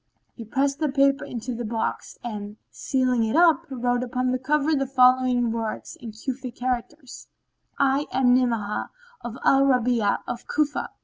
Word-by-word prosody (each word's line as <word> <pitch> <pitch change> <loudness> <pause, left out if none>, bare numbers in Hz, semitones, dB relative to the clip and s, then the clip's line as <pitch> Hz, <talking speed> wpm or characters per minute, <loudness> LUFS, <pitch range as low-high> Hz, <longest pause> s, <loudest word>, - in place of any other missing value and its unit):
He 230 - -9
pressed 275 +5 0
the 305 -2 0
paper 275 +1 +2
into 245 +1 -5
the 240 +1 -5
box 225 0 -3
and, 210 -3 -6
sealing 255 -3 0
it 220 +4 -1
up, 335 -1 +4
wrote 245 -2 -1
upon 250 0 -1
the 255 - -1
cover 300 +3 +1
the 275 -2 0
following 255 -2 +3
words 225 -1 -4
in 230 -2 -9
Cufic 250 +3 -6
characters, 255 +2 -5 0.5
"I 275 +1 +2
am 250 -1 +3
Ni'amah 230 -5 0 0.3
of 240 0 -6
al 270 - +5
Rabi'a 245 -5 +2
of 240 - -6
Cufa." 295 -1 -1
250 Hz, 160 wpm, -24 LUFS, 235-275 Hz, 0.5 s, al